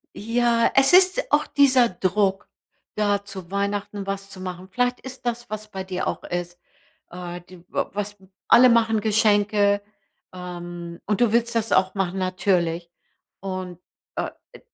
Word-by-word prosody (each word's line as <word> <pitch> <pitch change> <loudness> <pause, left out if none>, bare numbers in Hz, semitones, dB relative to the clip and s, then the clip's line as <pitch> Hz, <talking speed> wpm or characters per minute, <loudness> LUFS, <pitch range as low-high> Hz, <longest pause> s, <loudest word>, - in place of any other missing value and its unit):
Ja, 230 +1 +1
es 270 +3 +5
ist 375 +7 +5
auch - - +3
dieser 260 -4 +4
Druck, 195 +1 0 0.5
da 205 -1 +1
zu 190 -3 -9
Weihnachten 200 0 -2
was 195 0 -4
zu 190 -1 -10
machen. 185 0 -7
Vielleicht 245 +3 0
ist 260 -1 -10
das, 240 0 -3
was 215 0 -6
bei 190 -1 -5
dir 185 -1 -3
auch - - -4
ist, 175 0 -4 0.5
äh, 175 0 -7
d 185 +1 -15
w - - -1
was 205 +1 -4 0.3
alle 245 +2 +8
machen 225 -2 +3
Geschenke, 205 -1 +3 0.5
ähm, 175 -1 -8
und 210 -1 0
du 235 -3 +3
willst 235 0 +1
das 225 -1 0
auch 185 0 +3
machen, 195 -1 -1
natürlich. 180 -2 0 0.5
Und, 185 -2 -5 0.4
äh, - - -2 0.2
e - - -14
200 Hz, 155 wpm, -23 LUFS, 185-230 Hz, 0.5 s, alle